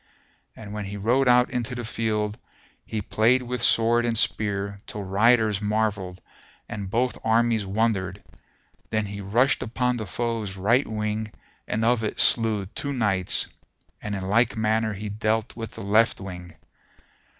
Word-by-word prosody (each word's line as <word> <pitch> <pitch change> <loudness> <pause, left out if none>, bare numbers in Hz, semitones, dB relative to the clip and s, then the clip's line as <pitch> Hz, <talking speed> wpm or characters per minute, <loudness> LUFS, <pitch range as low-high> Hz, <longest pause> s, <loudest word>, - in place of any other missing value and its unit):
And 105 -2 -9
when 105 -1 -4
he 100 +1 -6
rode 125 +6 +2
out 125 0 +5
into 125 -1 -3
the 120 - -4
field 105 -2 -1 0.5
he 110 -2 -4
played 120 +6 +2
with 125 0 -4
sword 115 +1 +4
and 115 -1 +1
spear 100 -2 0
till 105 - -5
riders 105 +1 +3
marvelled 105 -3 -1 0.5
and 100 -2 -5
both 125 +4 0
armies 115 -2 +2
wondered; 100 -2 -1 0.7
then 110 -1 0
he 100 0 -6
rushed 120 +8 +2
upon 125 +1 -1
the 110 -3 -5
foe's 115 -2 -3
right 115 +8 +2
wing 110 0 -3 0.4
and 110 +1 -1
of 120 -1 +2
it 105 - -3
slew 110 -4 +3
two 140 +8 -4
knights 105 -7 +1 0.5
and 105 -1 -4
in 95 -1 -4
like 115 +4 +2
manner 110 0 +1
he 105 +2 -6
dealt 110 +2 -1
with 115 -2 -6
the - - -8
left 110 +3 +3
wing. 90 -3 -8
110 Hz, 155 wpm, -25 LUFS, 100-115 Hz, 0.7 s, out